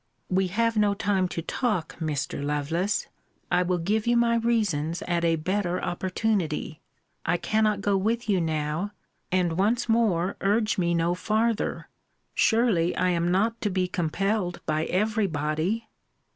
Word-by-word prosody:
We 190 0 +2
have 230 +4 0
no 205 -1 +3
time 195 -2 +1
to 165 -2 -5
talk, 210 -7 -1
Mr. 150 -3 -2
Lovelace. 155 +7 -1 0.4
I 180 0 +4
will 180 0 +1
give 210 +6 0
you 240 0 +4
my 235 0 +3
reasons 200 -9 0
at 170 -1 -1
a 165 -1 +3
better 180 +2 -1
opportunity. 180 -4 -2 0.4
I 175 - +1
cannot 215 +1 +1
go 200 0 +1
with 225 +5 -1
you 195 -4 +2
now 160 +4 -2 0.4
and 180 -2 +1
once 230 +6 +2
more 200 -6 +2
urge 210 +1 +1
me 170 -1 +1
no 170 +1 +1
farther 220 +4 0 0.5
surely, 220 -7 +2
I 185 - +1
am 170 0 +1
not 220 +6 +1
to 210 - 0
be 185 -1 0
compelled 180 +2 -1
by 155 +1 0
every 215 +3 +1
body! 160 +8 -1
185 Hz, 150 wpm, -26 LUFS, 170-215 Hz, 0.5 s, I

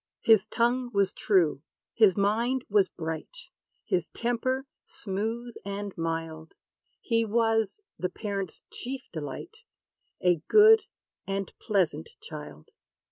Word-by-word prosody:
His 220 -2 +5
tongue 245 +2 +1
was 200 0 +2
true, 175 -9 +2 0.3
his 210 -5 +5
mind 235 +6 +1
was 200 -2 +3
bright; 165 - -6 0.4
His 175 -3 0
temper 255 +3 -1 0.2
smooth 225 +4 -4
and 200 0 -5
mild: 165 -1 -4 0.5
He 230 -2 +1
was 225 - +1 0.2
the 180 - -1
parent's 200 -2 -5
chief 260 +1 -5
delight 160 - -6 0.6
A 180 -1 +3
good 435 +1 +7 0.4
and 195 -1 -3
pleasant 175 -7 0
child. 150 - -10
205 Hz, 110 wpm, -28 LUFS, 180-235 Hz, 0.6 s, good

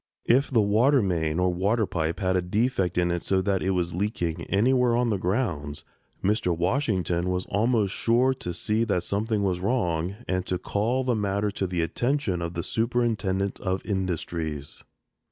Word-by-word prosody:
If 135 +4 +3
the 115 -5 +3
water 120 +6 +4
main, 80 -4 0
or 90 0 +2
water 105 +5 +1
pipe, 85 0 -2
had 95 -1 +1
a 90 - +2
defect 95 -1 0
in 90 0 +2
it 85 0 -1
so 95 - +1
that 95 -2 0
it 95 - 0
was 90 -2 0
leaking 85 -3 -2
anywhere 125 +3 +3
on 120 -1 +1
the 100 - +1
grounds, 80 - -2 0.4
Mr. 95 -4 +1
Washington 90 - 0
was 90 0 -1
almost 105 -1 +1
sure 125 +3 +2
to 130 -9 -5
see 105 +6 0
that 100 -6 0
something 105 +1 -1
was 90 -2 0
wrong 90 -5 0
and 90 0 0
to 90 - 0
call 115 +8 -1
the 125 -1 +1
matter 100 -1 0
to 95 -1 -2
the 90 -2 -1
attention 120 - -1
of 85 0 -4
the 85 - -2
Superintendent 110 -5 0
of 95 -1 -2
Industries. 85 -6 -3
95 Hz, 175 wpm, -26 LUFS, 90-115 Hz, 0.4 s, water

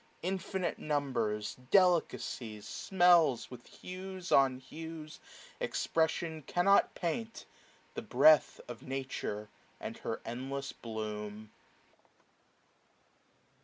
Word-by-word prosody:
Infinite 190 0 -2
numbers, 120 -8 -1 0.2
delicacies, 155 - +2
smells, 175 - +4
550 125 - -9 0.2
With - - -17
hues 185 0 -7
on 135 -2 +5
hues 155 +3 -9 0.4
expression 160 0 0
cannot 175 +7 +3
paint. 220 +7 -3 0.5
The - - -4
breath 155 -1 +5
of 120 -1 -8
Nature, 130 -6 -4 0.3
and - - -6
her - - -4
endless 135 +3 -4
bloom. 105 -1 -6
145 Hz, 90 wpm, -33 LUFS, 120-175 Hz, 0.5 s, on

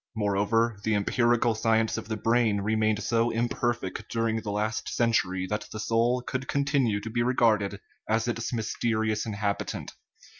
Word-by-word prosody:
Moreover, 105 +2 +1
the 110 -1 +1
em 100 -1 0
pirical 120 -1 +2
science 110 0 +2
of - - -5
the 110 -1 -3
brain 115 -3 +2
remained 110 0 +1
so 115 0 +2
imperfect 120 -3 -2
dur 115 0 0
ing 110 0 -1
the 105 - -5
last 105 +2 -2
century 95 -6 +1
that 105 +3 -3
the 110 - -6
soul 115 +3 +1
could 130 +1 -4
continue 140 -7 +1
to 110 - -6
be 120 +1 0
regarded 110 -5 +2 0.3
as 110 +2 +1
its 115 -1 -2
mysterious 110 -1 -1
inhabitant. 100 -1 -3
110 Hz, 160 wpm, -27 LUFS, 105-120 Hz, 0.3 s, pirical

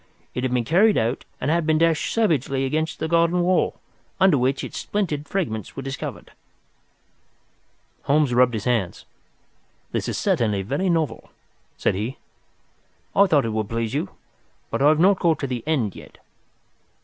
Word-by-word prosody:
It 125 - -3
had 130 - 0
been 125 -2 0
carried 200 - +4
out 115 +3 -1
and 140 - 0
had 170 -1 +1
been 155 -1 +3
dashed 165 -1 +2
savagely 140 - +1
against 155 +3 -1
the 160 - -2
garden 170 +2 +2
wall, 180 +1 +1 0.4
under 190 -4 +5
which 135 +1 0
its - - -5
splintered 155 -8 -2
fragments 110 - -3
were 135 - -5
discovered." 135 +1 -6 1.7
Holmes 145 -2 +2
rubbed 125 -1 +4
his 105 - -3
hands. 115 -8 -1 0.9
"This - - -2
is - - -2
certainly 105 -4 +1
very 140 - -1
novel," 160 -9 -1 0.5
said - - +1
he. 110 +8 -4 1.0
"I 200 0 +6
thought 145 -7 +3
it 110 - -2
would 110 -2 -2
please 115 0 -2
you. 140 -8 -1 0.6
But - - -2
I 145 - +6
have 155 0 +3
not 190 +2 +4
got 165 -3 +2
to - - -3
the 125 -3 -4
end 130 -11 0
yet. - - -12
Dr. - - -24
140 Hz, 170 wpm, -23 LUFS, 120-165 Hz, 1.7 s, I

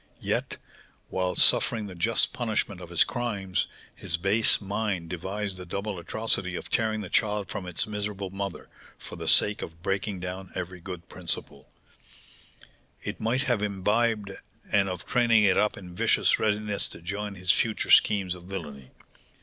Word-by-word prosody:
Yet, - - -1 0.5
while 90 -1 -1
suffering 110 -2 +4
the 95 - -7
just 105 +6 +1
punishment 110 -5 -1
of 90 - -9
his 85 - +5
crimes, 100 -7 -2 0.3
his 85 - -2
base 100 +5 +4
mind 100 -4 -2
devised 95 +2 -3
the 90 - -6
double 100 +1 -3
atrocity 90 0 -1
of - - -6
tearing 110 -1 +1
the 100 - -5
child 105 -2 +1
from 90 - -5
its 90 - -1
miserable 105 -2 -4
mother, 100 -1 -5 0.3
for - - -10
the - - -6
sake 105 0 +4
of 80 +1 -8
breaking 95 0 -1
down 90 +1 -5
every 90 0 -5
good 85 -1 -8
principle 90 -2 -2 1.3
it - - -5
might 120 +4 +1
have 120 -5 +1
imbibed, 105 +1 +1 0.4
and 100 -1 +3
of 90 -1 -5
training 115 -3 +4
it 95 -3 +5
up 105 - +2
in 90 -2 -10
vicious - - +3
readiness 105 -1 0
to - - -11
join 100 +3 -4
his 90 -1 +2
future 110 -2 0
schemes 95 -4 +5
of 90 -1 -11
villainy. 75 -9 -7
100 Hz, 160 wpm, -27 LUFS, 90-105 Hz, 1.3 s, his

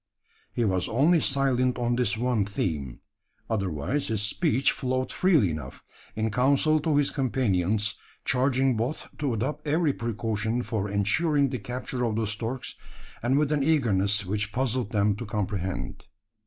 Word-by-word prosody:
He 120 - 0
was 95 -3 0
only 150 +9 +4
silent 130 -3 +1
on 120 0 0
this 120 -4 +1
one 120 -3 +1
theme. 80 -10 -3 0.5
Otherwise 100 - -1
his 110 -2 0
speech 135 +3 +2
flowed 130 0 -2
freely 155 - +3
enough 75 -5 -7 0.3
in 110 0 -1
counsel 140 +6 +3
to 155 0 0
his 145 -1 +2
companions 110 -6 0 0.3
charging 130 0 +2
both 120 +7 -3
to 145 -3 0
adopt 150 +8 -3
every 155 -1 +2
precaution 115 0 -2
for 105 -4 -2
ensuring 140 - +2
the 130 -2 -3
capture 125 +3 -4
of 115 -3 0
the 110 0 0
storks 115 +4 -4 0.5
and 125 +4 +2
with 150 0 +2
an 150 -1 +2
eagerness, 105 -9 +2
which 105 +2 -2
puzzled 125 -2 -1
them 105 -2 +2
to 120 - -5
comprehend. 100 -4 -3
120 Hz, 150 wpm, -27 LUFS, 105-135 Hz, 0.5 s, only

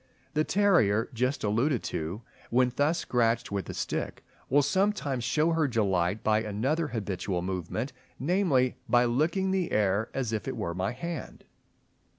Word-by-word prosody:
The 155 0 +2
terrier 165 - +3
just 125 +4 -1
alluded 115 +5 +1
to, 85 +9 -4 0.3
when 125 0 +3
thus 150 +5 +2
scratched 120 -2 +1
with 100 -1 -3
a - - -5
stick, - - -3 0.3
will 145 +2 +4
sometimes 185 - 0
show 155 +6 +2
her 160 -2 +2
delight 100 -5 0
by 110 0 +3
another 130 +10 -1
habitual 95 -6 -3
movement, 95 - -3 0.2
namely, 145 -5 +2
by 120 0 +5
licking 165 +10 +1
the 190 -3 0
air 105 +1 +1
as 125 -4 -2
if 110 - -3
it 130 -2 -3
were 85 -6 -2
my 95 +2 -1
hand. 170 +6 -6
125 Hz, 155 wpm, -28 LUFS, 105-155 Hz, 0.3 s, by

